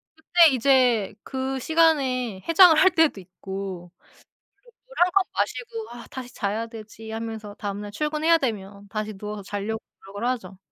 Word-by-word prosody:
그때 330 +1 +5
이제 250 -5 +3
그 265 0 -3
시간에 260 - +1
해장을 335 0 +8
할 375 +3 +6
때도 320 -11 +3
있고 190 -1 -7
그리고 - - -29 0.8
물 - - -15
1 355 +1 +4
컵 395 -1 +3
마시고 460 -2 -3
'아 240 0 -10
다시 255 -2 -8
자야 215 +3 -2
되지.' 220 -1 -10
하면서 220 -2 -6
다음 205 0 -4
날 205 0 -7
출근해야 305 +6 +2
되면 205 -6 -4
다시 215 +1 -4
누워서 210 0 -7
자려고 205 +3 -4 0.2
노력을 205 +4 -4
하죠. 195 -7 -4
230 Hz, 315 characters per minute, -24 LUFS, 205-300 Hz, 0.8 s, 해장을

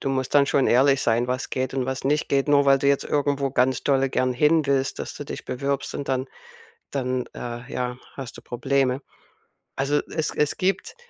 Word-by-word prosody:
du 135 - -1
musst 130 +1 -2
dann 140 -1 +7
schon 140 -2 +2
ehrlich 135 +2 +4
sein, 115 +1 +2
was 125 +1 -2
geht 130 0 -2
und 130 -1 -1
was 130 0 -3
nicht 150 +2 +1
geht. 140 +1 +1
Nur 140 -1 +4
weil 135 0 +6
du 140 - -1
jetzt 140 0 +3
irgendwo 140 -1 0
ganz 130 0 +1
dolle 135 -1 +2
gern 130 -1 +1
hinwillst, 140 -2 +2
dass - - -5
du - - -7
dich - - -7
bewirbst 140 +2 -2
und 140 - -5
dann 130 0 0 0.7
dann, 130 -2 -1
äh, 120 +2 -7
ja, 125 0 -3 0.2
hast 135 -4 -8
du - - -11
Probleme. 130 +2 0 0.7
Also, 140 +2 +1
es 160 -1 -1
es 150 -1 +1
gibt 190 0 -1
135 Hz, 200 wpm, -24 LUFS, 130-140 Hz, 0.7 s, dann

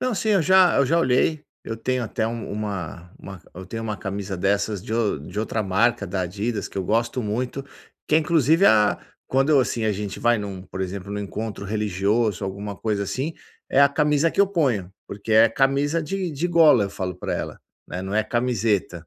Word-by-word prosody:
Não, 255 -2 0
sim, 215 +2 -1
eu 195 -5 +4
já 185 +1 +5
eu 140 - +3
já 165 +4 +2
olhei. 150 +2 +1 0.2
Eu 115 - -5
tenho 125 +2 -1
até 110 -1 -2
um 115 0 -5
uma 95 -4 -5
uma 95 -3 -10
eu 95 +1 -9
tenho 115 +3 -5
uma 105 -2 -3
camisa 100 0 -5
dessas 100 +1 0
de 110 0 -7
ou 115 -9 0
de 90 +8 -8
outra 110 0 -1
marca 100 +2 +1
da 95 0 -2
Adidas 105 +4 -3
que - - -6
eu 95 - -2
gosto 115 +4 0
muito, 125 +6 -3 0.5
que - - +2
é, 155 - +7
inclusive, 160 +2 +3
a 105 -1 +4 0.3
quando, 135 +3 +3
assim, 115 -2 -1
a 110 - +2
gente 100 0 -5
vai 120 -1 +2
num, 100 -3 -6
por 95 0 -8
exemplo, 95 +1 -4
num 105 - -3
encontro 105 0 -5
religioso, 105 0 0
alguma 100 +1 -5
coisa 105 -2 -1
assim, 130 - -3 0.4
é 140 - +4
a 140 - +7
camisa 150 +2 +2
que - - 0
eu 200 - +6
ponho, 125 - 0
porque 100 +2 -5
é 110 +1 +7
camisa 140 +6 +1
de 185 +3 -3
de 160 +5 -2
gola. 155 -10 +5
Eu 100 - -4
falo 95 -2 -4
pra - - -4
ela, - - -5 0.3
né, 90 - -5
não 95 +1 -4
é 110 0 +2
camiseta. 110 -8 -1
110 Hz, 210 wpm, -23 LUFS, 100-135 Hz, 0.5 s, é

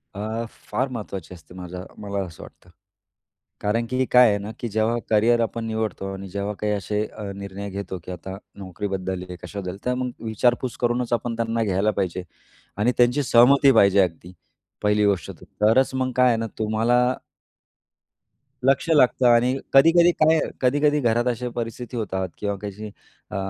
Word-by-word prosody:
अ, 110 +3 -3 0.2
फार 125 +6 0
महत्त्वाची 100 -7 -7
असते, 90 0 -15
माझा 90 0 -7
मला 100 -1 -4
असं 85 -4 -11
वाटतं, 90 - -16 0.9
कारण 115 +3 0
की 130 0 +1
काय 125 -2 +7
आहे 100 - +1
ना, 105 +2 -6
की 120 - -3
जेव्हा 110 +3 +1
करिअर 115 +2 +4
आपण 115 0 -2
निवडतो 110 -3 -3
आणि 95 0 -7
जेव्हा 100 +2 -3
काही 105 0 -1
असे 105 +1 -2
अ, 110 - -10
निर्णय 100 0 -7
घेतो, 95 -1 -6
की - - -8
आता 95 +2 -7 0.2
नोकरीबद्दल 95 -1 -4
आहे 90 - -6
कशाबद्दल, 95 -2 -6
तर 125 - +1
मग 125 0 -2
विचारपूस 120 +3 0
करूनच 120 0 0
आपण 115 0 -1
त्यांना 115 0 -1
घ्यायला 100 +1 +1
पाहिजे 90 -1 -2 0.5
आणि 115 +4 +2
त्यांची 125 +4 +3
सहमती 135 +3 +6
पाहिजे 100 -4 +5
अगदी 90 0 -3 0.5
पहिली 105 0 +3
गोष्ट 100 -3 0
तरच 115 +6 +2
मग 130 0 -1
काय 125 0 +5
आहे 115 -2 +3
ना 115 - -2
तुम्हाला 110 +3 +1 1.7
लक्ष 135 +4 +2
लागतं 130 -5 +4
आणि 120 +2 +4 0.2
कधी-कधी 170 +5 +6
काय 160 -1 +3
आहे, - - 0
कधी-कधी 145 +3 +3
घरात 120 -1 +1
अशा 125 0 -1
परिस्थिती 120 +1 -5
होतात 95 -4 -2
किंवा 100 -1 -2
काही 105 +1 -6 0.4
अ, - - -5
110 Hz, 165 wpm, -23 LUFS, 100-125 Hz, 1.7 s, काय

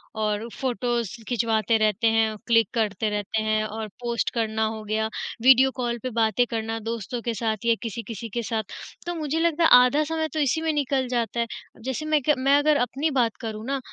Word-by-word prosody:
और 215 0 -1
फोटोज़ 240 -3 -1 0.2
खिंचवाते 225 -2 +1
रहते 215 +1 +2
हैं, 220 -1 +2
क्लिक 230 -3 +4
करते 215 -2 0
रहते 210 +1 -2
हैं 215 0 +1
और 215 +1 -5
पोस्ट 235 -1 -1
करना 220 -2 0
हो 220 0 -5
गया, 215 +1 -1 0.3
वीडियो 265 +2 +6
कॉल 240 -2 -2
पे 255 - -2
बातें 230 0 +2
करना, 225 0 -3
दोस्तों 230 +2 -4
के 235 0 -2
साथ 220 0 -2
या 230 -1 +4
किसी 230 -1 -4
किसी 230 0 -6
के 235 +3 -3
साथ। 220 -1 -2 0.4
तो 345 0 -3
मुझे 310 -1 -2
लगता 335 0 +2
है - - +6 0.2
आधा 285 +4 +2
समय 320 +1 -2
तो 315 - -1
इसी 295 +2 +1
में 320 0 +1
निकल 275 -3 0
जाता 240 -1 -1
है। 235 - +2 0.4
जैसे 265 +4 -3
मैं 310 -1 +2
क - - +7
मैं 275 +2 +4
अगर 295 0 +3
अपनी 270 +5 0
बात 240 -5 +1
करूँ 220 -1 -5
ना, 275 +1 -1
235 Hz, 205 wpm, -25 LUFS, 220-265 Hz, 0.4 s, क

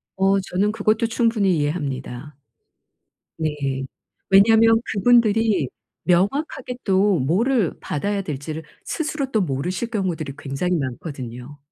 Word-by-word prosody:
어 195 +1 +3
저는 190 +2 0
그것도 220 +1 +1
충분히 225 -6 +2
이해합니다. 145 -2 -3 1.0
네. 140 -4 -2 0.4
왜냐하면 225 +3 +6
그분들이 220 - +3 0.4
명확하게 245 - 0
또 195 -2 +3
뭐를 200 - +1
받아야 200 +7 -2
될지를 155 -1 -5 0.2
스스로 300 -4 -3
또 220 - +2
모르실 180 - -2
경우들이 175 - -2
굉장히 155 +5 -2
많거든요. 130 -1 -6
185 Hz, 275 characters per minute, -22 LUFS, 145-220 Hz, 1.0 s, 왜냐하면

